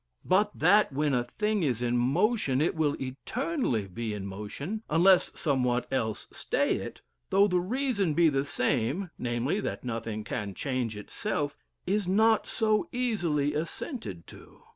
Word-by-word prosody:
But 205 +3 +2
that 200 +5 +5
when 145 +1 0
a 125 -1 +2
thing 210 - -1
is 125 -7 0
in 120 0 +1
motion, 140 - +2
it 155 - +2
will 155 -3 0
eternally 130 - -2
be 110 +3 -4
in 100 -2 -5
motion, 105 - -5
unless 175 +4 +5
somewhat 125 -5 +1
else 110 -5 -1
stay - - 0
it, - - -7 0.3
though 195 +1 +5
the 180 -2 +2
reason 205 - 0
be 170 -1 +5
the 135 -3 +2
same 140 - -1
namely, 125 - -1
that - - -4
nothing 115 -3 -4
can 105 -3 -4
change 125 -5 -2
itself 145 - -3 0.3
is 200 0 0
not 220 +3 +3
so 215 -2 +1
easily 175 - 0
assented 150 - -4
to. - - -15
150 Hz, 150 wpm, -29 LUFS, 120-200 Hz, 0.3 s, that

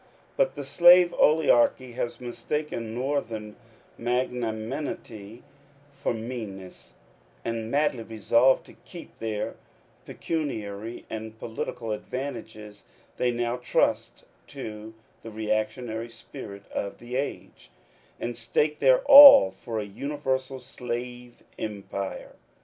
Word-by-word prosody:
]Dut - - +1
the - - -6
slave 175 0 +6
oligarchy 130 -4 +3
has 120 0 -4
mistaken 120 -2 -4
Northern 115 -5 -3 0.4
magnanimity 120 - -4 0.5
for 140 - -3
meanness; 110 -5 -7 0.5
and, 115 -1 -3
madly 140 -2 +1
resolved 115 +4 +2
to - - -15
keep 175 -2 -13
their 110 -2 -4 0.5
pecuniary 115 -8 -4
and 110 0 -7
political 115 0 -5
advantages, 110 -3 -6 0.3
they 125 - +1
now 120 0 -1
trust 125 - -1 0.2
to 110 +1 -8 0.3
the 115 - -9
re 110 0 -6
actionary 115 +1 -2
spirit 100 -7 -10
of 100 - -4
the 120 +1 -8
age, 140 +2 -5 0.5
and 120 0 -4
stake 150 +6 0
their 130 -2 +5
all 280 - +11
for 110 +4 -7
a - - -2
universal 130 +3 -3
slave 125 -1 -7 0.2
empire. 100 -2 -5
120 Hz, 105 wpm, -26 LUFS, 110-135 Hz, 0.5 s, all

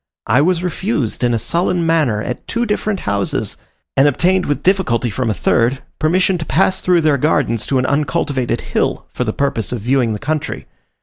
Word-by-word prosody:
I 125 +6 +3
was 175 +2 +1
refused 180 - -2
in 120 - +3
a 115 - +1
sullen 170 - 0
manner 150 -10 +1
at 125 - -5
two 235 +1 -1
different 210 -2 -1
houses, 100 -1 -2 0.4
and 135 +2 +5
obtained 180 +6 +2
with 145 - -1
difficulty 140 - +1
from 125 +3 -1
a - - +1
third, 120 +7 +1 0.2
permission 180 +3 +2
to 160 - -4
pass 185 +6 +2
through 180 -2 +3
their 150 -3 +2
gardens 125 -6 +1
to 135 - +1
an 130 - +1
uncultivated 145 -2 0
hill, - - -1
for - - -1
the - - -1
purpose 140 -8 -2
of 120 -3 -3
viewing 120 -1 +1
the - - -3
country. 150 +4 -3
145 Hz, 190 wpm, -17 LUFS, 120-175 Hz, 0.4 s, and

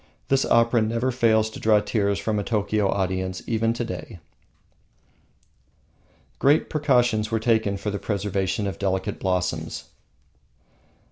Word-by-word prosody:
This 135 0 +3
opera 115 0 +3
never 115 +4 0
fails 110 -3 +3
to - - -9
draw 110 -1 +4
tears 100 -1 0
from 110 -2 -1
a - - -2
Tokio 105 -1 0
audience 95 -1 -2
even 115 0 +1
to 120 0 -3
day. 90 -3 -7 2.2
Great 145 +3 +3
precautions 125 -7 +2
were 110 0 0
taken 110 -3 +1
for 105 +1 -3
the 100 - -3
preservation 100 -1 -2
of 95 -4 -4
delicate 95 +1 -2
blossoms. 90 -4 -2
105 Hz, 130 wpm, -24 LUFS, 95-115 Hz, 2.2 s, draw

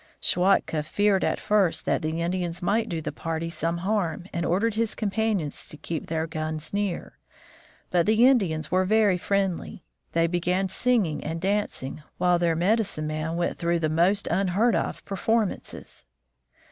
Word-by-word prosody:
Schwatka 180 -4 +2
feared 195 +5 +1
at - - 0
first 200 -5 +1
that - - +1
the 160 +1 -2
Indians 175 0 -2
might 220 +5 +1
do 165 -2 -2
the - - -4
party 165 0 -4
some 165 +1 -1
harm, 190 -5 -1
and 170 -2 -1
ordered 205 +6 +1
his 225 0 -1
companions 210 -7 -1
to 150 - -10
keep 160 0 -5
their 160 0 -1
guns 155 0 -4
near. 200 -3 -3 0.7
But 175 0 +2
the 220 +3 +5
Indians 180 - +2
were 185 +1 +3
very 205 -2 +3
friendly. 195 -2 -1 0.3
They 165 0 +3
began 180 +3 0
singing 205 -6 +1
and 160 +2 -3
dancing, 190 -7 -2 0.2
while 180 -1 +3
their 170 -1 +2
medicine 190 -2 +1
man 155 +2 -3
went 175 0 -1
through 170 0 +1
the 160 -2 0
most 180 +6 +2
unheard 195 +6 +2
of - - -2
performances. 210 - -2
180 Hz, 160 wpm, -26 LUFS, 165-205 Hz, 0.7 s, the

